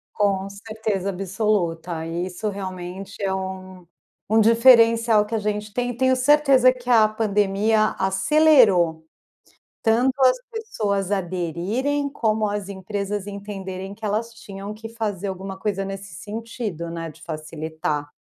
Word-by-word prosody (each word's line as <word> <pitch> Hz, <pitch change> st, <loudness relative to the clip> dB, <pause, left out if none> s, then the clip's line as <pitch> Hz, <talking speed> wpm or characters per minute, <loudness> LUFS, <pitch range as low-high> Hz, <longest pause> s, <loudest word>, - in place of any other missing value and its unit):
Com 195 Hz, -2 st, +1 dB
certeza 205 Hz, -1 st, -3 dB
absoluta, 180 Hz, -4 st, -1 dB
e 170 Hz, +2 st, -3 dB
isso 185 Hz, +4 st, -4 dB
realmente 190 Hz, 0 st, -6 dB
é 195 Hz, -1 st, 0 dB
um 185 Hz, -1 st, -6 dB, 0.5 s
um 220 Hz, -, +6 dB
diferencial 230 Hz, -1 st, +5 dB
que 220 Hz, -, -5 dB
a -, -, +2 dB
gente 210 Hz, 0 st, -3 dB
tem, 245 Hz, 0 st, -1 dB
e 245 Hz, -, -6 dB
tenho 260 Hz, +1 st, +3 dB
certeza 265 Hz, -1 st, +5 dB
que 250 Hz, -1 st, -12 dB
a 225 Hz, -3 st, +6 dB
pandemia 215 Hz, 0 st, +1 dB
acelerou, 195 Hz, -, +4 dB, 0.8 s
tanto 240 Hz, +4 st, +3 dB
as 255 Hz, -1 st, +5 dB
pessoas 210 Hz, -, -2 dB
aderirem, 195 Hz, -, -1 dB
como 220 Hz, -5 st, 0 dB
as 205 Hz, -1 st, -4 dB
empresas 200 Hz, +1 st, -4 dB
entenderem 195 Hz, -1 st, -6 dB
que 220 Hz, +2 st, -8 dB
elas 220 Hz, +3 st, -2 dB
tinham 200 Hz, -2 st, -8 dB
que 220 Hz, +1 st, -9 dB
fazer 215 Hz, -4 st, -4 dB
alguma 190 Hz, 0 st, -6 dB
coisa 195 Hz, -1 st, -1 dB
nesse 195 Hz, -1 st, -7 dB
sentido, 210 Hz, -3 st, -5 dB
né, 165 Hz, 0 st, -5 dB
de 160 Hz, -, -20 dB
facilitar. 155 Hz, -2 st, -4 dB
205 Hz, 135 wpm, -23 LUFS, 190-225 Hz, 0.8 s, um